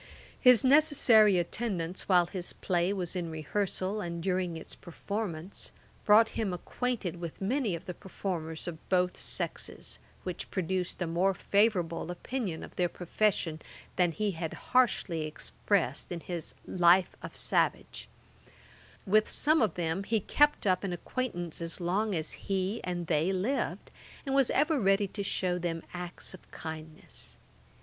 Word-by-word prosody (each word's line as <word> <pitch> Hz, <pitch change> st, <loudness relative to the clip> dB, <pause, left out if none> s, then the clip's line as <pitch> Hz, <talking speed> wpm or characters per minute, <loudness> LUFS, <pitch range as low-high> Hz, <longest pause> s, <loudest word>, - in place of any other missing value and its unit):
His 250 Hz, -3 st, +7 dB
necessary 255 Hz, -8 st, +6 dB
attendance 180 Hz, -1 st, -2 dB
while 180 Hz, -2 st, +6 dB
his 180 Hz, 0 st, -3 dB
play 175 Hz, 0 st, 0 dB
was 185 Hz, -3 st, -2 dB
in 175 Hz, -2 st, -2 dB
rehearsal, 190 Hz, +5 st, -2 dB
and 170 Hz, -2 st, -4 dB
during 180 Hz, -3 st, 0 dB
its 160 Hz, -, -8 dB
performance, 185 Hz, -1 st, -5 dB, 0.3 s
brought 220 Hz, +2 st, +7 dB
him 215 Hz, -4 st, -2 dB
acquainted 200 Hz, -2 st, -3 dB
with 170 Hz, -2 st, -6 dB
many 220 Hz, -1 st, 0 dB
of 170 Hz, -, -9 dB
the 180 Hz, -, -4 dB
performers 170 Hz, -4 st, -4 dB
of 160 Hz, -2 st, -8 dB
both 180 Hz, -1 st, +2 dB
sexes, -, -, -4 dB, 0.2 s
which 180 Hz, -2 st, -5 dB
produced 185 Hz, 0 st, -2 dB
a -, -, -1 dB
more 180 Hz, +4 st, +1 dB
favourable 180 Hz, -6 st, +1 dB
opinion 185 Hz, -1 st, -3 dB
of -, -, -11 dB
their 180 Hz, -1 st, +2 dB
profession 175 Hz, -3 st, 0 dB, 0.3 s
than 180 Hz, -2 st, +3 dB
he 210 Hz, +5 st, -1 dB
had 165 Hz, -2 st, -4 dB, 0.2 s
harshly 235 Hz, -9 st, +3 dB
expressed 155 Hz, -, -1 dB
in 170 Hz, -1 st, -4 dB
his 170 Hz, -2 st, -5 dB
Life 180 Hz, +1 st, +4 dB
of -, -, -8 dB
Savage. -, -, 0 dB, 1.0 s
With 215 Hz, +2 st, +4 dB
some 310 Hz, 0 st, +3 dB
of 220 Hz, -, +2 dB
them 175 Hz, +2 st, -1 dB
he 225 Hz, +1 st, +1 dB
kept 295 Hz, +7 st, +3 dB
up 185 Hz, -1 st, +2 dB
an 190 Hz, -3 st, -2 dB
acquaintance 175 Hz, -5 st, -4 dB
as 165 Hz, +2 st, -2 dB
long 195 Hz, +4 st, 0 dB
as 160 Hz, -1 st, -2 dB
he 195 Hz, +3 st, -2 dB
and 175 Hz, -1 st, -3 dB
they 160 Hz, +2 st, +2 dB
lived, 195 Hz, +9 st, -1 dB, 0.3 s
and 270 Hz, -, -1 dB
was 275 Hz, -2 st, +4 dB
ever 300 Hz, +1 st, +2 dB
ready 195 Hz, -1 st, +3 dB
to 205 Hz, -, -5 dB
shew 180 Hz, -2 st, 0 dB
them 165 Hz, -2 st, -3 dB
acts 180 Hz, 0 st, -4 dB
of 185 Hz, -, -14 dB
kindness. 160 Hz, -1 st, -8 dB
185 Hz, 150 wpm, -30 LUFS, 170-210 Hz, 1.0 s, His